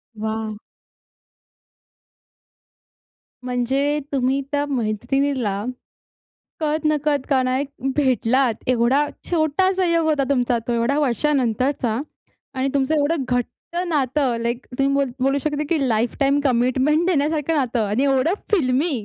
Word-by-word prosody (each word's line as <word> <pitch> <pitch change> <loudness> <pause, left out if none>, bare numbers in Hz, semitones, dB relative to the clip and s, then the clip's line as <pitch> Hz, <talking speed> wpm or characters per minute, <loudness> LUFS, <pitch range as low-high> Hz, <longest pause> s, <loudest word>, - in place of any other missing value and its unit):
वाह! 220 0 -4 2.9
म्हणजे 265 +4 0
तुम्ही 265 +1 +1
त्या 290 0 0
मैत्रिणीला 245 -3 -1 1.0
कळत-नकळत 300 -2 0
का 265 -3 +3
नाही 255 +2 0 0.3
भेटलात. 260 -3 +2
एवढा 255 +4 +3 0.2
छोटा 330 +2 +2
संयोग 335 -3 +1
होता 300 -3 +2
तुमचा 245 -3 +2
तो - - +1
एवढ्या 235 +5 +1
वर्षानंतरचा 255 -3 0 0.5
आणि 260 +1 0
तुमचं 275 +2 +1
एवढं 295 -1 +1
घट्ट 245 -1 +1 0.4
नातं 275 -5 0
लाइक 235 +2 -2
तुम्ही 275 0 +2
बोल 280 -2 +1
बोलू 275 +1 +2
शकता 295 +1 -2
की 330 - +1
लाईफटाईम 245 +5 +1
कमिटमेंट 260 +5 +2
देण्यासारखं 310 -2 +1
नातं 245 -6 0
आणि 220 +7 +1
एवढं 275 +5 +2 0.2
फिल्मी 290 -3 +2
270 Hz, 110 wpm, -21 LUFS, 245-295 Hz, 2.9 s, का